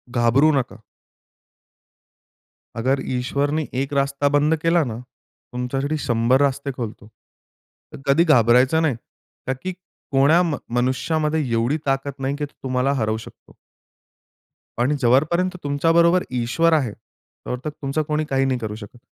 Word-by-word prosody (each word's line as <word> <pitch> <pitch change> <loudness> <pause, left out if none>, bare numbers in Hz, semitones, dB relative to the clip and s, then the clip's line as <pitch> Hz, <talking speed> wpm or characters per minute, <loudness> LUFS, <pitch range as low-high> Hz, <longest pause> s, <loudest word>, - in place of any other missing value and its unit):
घाबरू 120 +6 +4
नका. 120 -6 -2 2.0
अगर 130 +4 +1
ईश्वरनी 140 +5 -1
1 140 +1 -4
रास्ता 140 0 +1
बंद 150 +2 +3
केला 165 0 +3
ना, 115 -5 -5 0.6
तुमच्यासाठी 135 +5 -2
100 120 +2 +2
रास्ते 140 0 0
खोलतो. 110 -4 -6 0.9
तर - - -10
कधी 140 +5 +4
घाबरायचं 130 0 +4
नाही, 155 -6 +1 0.5
का 130 - +1
की 185 - -3 0.4
कोण्या 140 +6 +5
मनुष्यामध्ये 150 +1 -1
एवढी 115 +6 +1
ताकद 135 0 -1
नाही, 135 +1 -2
की 145 0 -3
तो 145 - -17
तुम्हाला 130 +1 0
हरवू 110 0 0
शकतो. 110 - -14 1.3
आणि 135 +5 +2
जोपर्यंत 155 +9 +2
तुमच्याबरोबर 165 +5 +3
ईश्वर 130 +7 +1
आहे 135 -8 +1
तोपर्यंत 125 +5 -9
तुमचं 140 +2 -1
कोणी 150 +1 -1
काही 135 0 +1
नाही 130 -2 0
करू 110 -2 -5
शकत. 105 +1 -11
135 Hz, 130 wpm, -22 LUFS, 125-150 Hz, 2.0 s, कोण्या